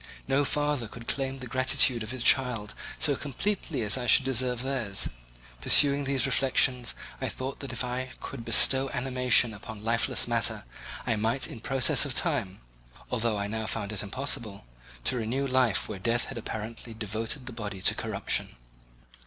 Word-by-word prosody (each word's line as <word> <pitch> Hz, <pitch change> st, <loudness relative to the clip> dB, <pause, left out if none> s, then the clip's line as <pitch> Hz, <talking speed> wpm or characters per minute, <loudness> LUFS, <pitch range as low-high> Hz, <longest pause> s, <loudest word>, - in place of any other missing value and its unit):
No 135 Hz, +2 st, +2 dB
father 145 Hz, -4 st, 0 dB
could 115 Hz, +2 st, -11 dB
claim 135 Hz, -1 st, -1 dB
the 130 Hz, -, -8 dB
gratitude 130 Hz, -1 st, +2 dB
of 110 Hz, -, -5 dB
his 130 Hz, -1 st, -3 dB
child 120 Hz, -6 st, +3 dB, 0.2 s
so 145 Hz, -3 st, +2 dB
completely 145 Hz, -, -2 dB
as 105 Hz, +4 st, +3 dB
I 120 Hz, -, -4 dB
should 130 Hz, -, +6 dB
deserve 125 Hz, -1 st, +1 dB
theirs. 125 Hz, -8 st, -1 dB, 0.5 s
Pursuing 140 Hz, -, +5 dB
these 135 Hz, -2 st, +1 dB
reflections, 130 Hz, -2 st, +2 dB, 0.3 s
I -, -, -1 dB
thought 130 Hz, +1 st, -5 dB
that 140 Hz, -, -6 dB
if -, -, -3 dB
I 125 Hz, +1 st, -3 dB
could 115 Hz, -, -7 dB
bestow 130 Hz, +3 st, +4 dB
animation 125 Hz, -2 st, +2 dB
upon 105 Hz, +1 st, -9 dB
lifeless 115 Hz, +1 st, +2 dB
matter, -, -, 0 dB, 0.4 s
I 115 Hz, -, 0 dB
might 115 Hz, +5 st, 0 dB
in 115 Hz, -, -7 dB
process 130 Hz, +2 st, +3 dB
of -, -, -2 dB
time 95 Hz, 0 st, 0 dB, 0.5 s
(although 115 Hz, -3 st, 0 dB
I 100 Hz, -, -2 dB
now 110 Hz, +1 st, -3 dB
found 105 Hz, -2 st, -2 dB
it 105 Hz, -, -2 dB
impossible) 110 Hz, -, -3 dB, 0.5 s
renew 125 Hz, +3 st, -1 dB
life 130 Hz, -6 st, +2 dB
where 105 Hz, -3 st, -6 dB
death 115 Hz, +5 st, +1 dB
had 135 Hz, -, -7 dB
apparently 115 Hz, +1 st, -6 dB
devoted 110 Hz, +5 st, -4 dB
the 125 Hz, -, -6 dB
body 105 Hz, -4 st, -6 dB
to -, -, +5 dB
corruption. -, -, -2 dB
125 Hz, 165 wpm, -28 LUFS, 110-135 Hz, 0.5 s, should